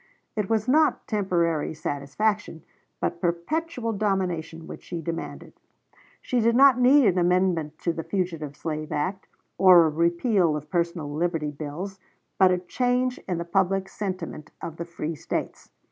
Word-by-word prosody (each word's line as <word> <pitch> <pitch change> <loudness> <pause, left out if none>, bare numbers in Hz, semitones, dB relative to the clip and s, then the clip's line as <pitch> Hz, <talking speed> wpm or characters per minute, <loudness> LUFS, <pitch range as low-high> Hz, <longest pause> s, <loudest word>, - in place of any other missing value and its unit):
It 210 -3 -2
was 220 0 +1
not 305 +4 +3
temporary 170 -7 0
satisfaction, 160 +5 -2 0.4
but 170 - -2
perpetual 230 - -1
domination 180 -6 -2
which - - -9
she 175 - -6
demanded. 165 +1 -6 0.7
She 250 - 0
did 230 +1 +3
not 265 -1 +7
need 265 +2 +6
an 185 -3 +3
amendment 175 -3 +1
of 170 -1 +1
the 165 - -2
fugitive 165 -7 -3
slave 155 -1 -4
act, 185 +6 -2 0.3
or 180 -3 +8
a - - +2
repeal 170 +2 +2
of 150 0 -7
personal 170 -4 -1
liberty 160 -1 -1
bills, 160 +7 -6 0.4
but 190 -1 +7
a 180 - +2
change 250 +7 0
in 180 -3 -1
the 170 - -3
public 190 +1 +1
sentiment 185 -6 -5
of 165 -1 -7
the 170 - -4
free 165 -1 -4
States. 150 - -5
180 Hz, 150 wpm, -25 LUFS, 165-205 Hz, 0.7 s, or